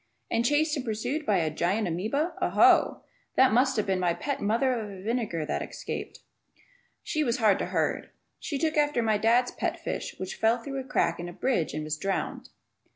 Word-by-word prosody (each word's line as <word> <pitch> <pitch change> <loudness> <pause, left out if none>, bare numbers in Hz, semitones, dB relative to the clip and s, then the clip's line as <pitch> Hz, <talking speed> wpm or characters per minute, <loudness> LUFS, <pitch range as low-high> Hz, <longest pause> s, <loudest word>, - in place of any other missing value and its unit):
And 230 0 +2
chased 295 +4 +2
and 275 - -3
pursued 245 +7 -3
by 205 -3 +3
a 160 -3 0
gigantic 180 +3 0
amoeba! 280 - -1
Oh, - - -1
oh! - - +5 0.3
That 260 -4 +5
must 260 +1 +3
have 215 - +1
been 190 -1 0
my 175 -2 +1
pet 280 -2 -3
mother 230 +6 +2
of 205 -5 -5
vinegar 215 -8 -1
that - - -2
escaped. - - -6 0.8
She 305 -1 0
was 235 -4 0
hard 215 -5 +3
to - - -2
herd. - - -1 0.3
She 290 - -3
took 315 +2 0
after 295 -5 +2
my 215 -2 +2
dad's 235 +3 +3
pet - - -3
fish - - -4
which 185 - -5
fell 225 +2 +3
through 275 +3 -5
a - - -4
crack 170 -8 +1
in 175 0 -5
a - - -9
bridge 180 - 0
and 155 - -3
was 155 0 -3
drowned. 195 0 -3
225 Hz, 205 wpm, -28 LUFS, 190-265 Hz, 0.8 s, oh